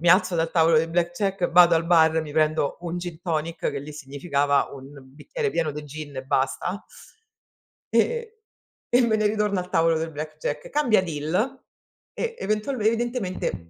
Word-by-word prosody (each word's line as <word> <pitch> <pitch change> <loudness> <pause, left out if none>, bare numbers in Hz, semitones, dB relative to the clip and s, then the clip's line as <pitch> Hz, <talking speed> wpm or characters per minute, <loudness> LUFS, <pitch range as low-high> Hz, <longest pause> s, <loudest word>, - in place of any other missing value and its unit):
mi 170 - +1
alzo 185 0 +5
dal 165 -1 0
tavolo 165 -1 +4
del 165 +1 0
blackjack, 175 +2 -1
vado 175 0 +7
al 165 0 +1
bar, 160 -2 +4
mi 150 -2 -8
prendo 155 -2 +1
un 175 0 -4
gin 175 -2 -7
tonic, 165 -1 -2
che - - -4
lì 150 +2 -9
significava 140 0 0
un 135 -1 -10 0.3
bicchiere 450 - -3
pieno 155 - -1
de 150 0 -7
gin 145 -1 -8
e 130 - -5
basta, 135 +9 -1 1.1
e 470 -1 +1 0.6
e 245 - +6
me 235 -2 +2
ne 215 -1 0
ritorno 210 -2 +1
al 180 - -6
tavolo 165 -2 +3
del 160 0 -3
blackjack. 155 0 -5
Cambia 260 -9 +3
deal 180 - -2 0.5
e 465 -1 -3
eventualme 215 +3 -2
evidentemente 220 - -1
170 Hz, 165 wpm, -24 LUFS, 155-210 Hz, 1.1 s, vado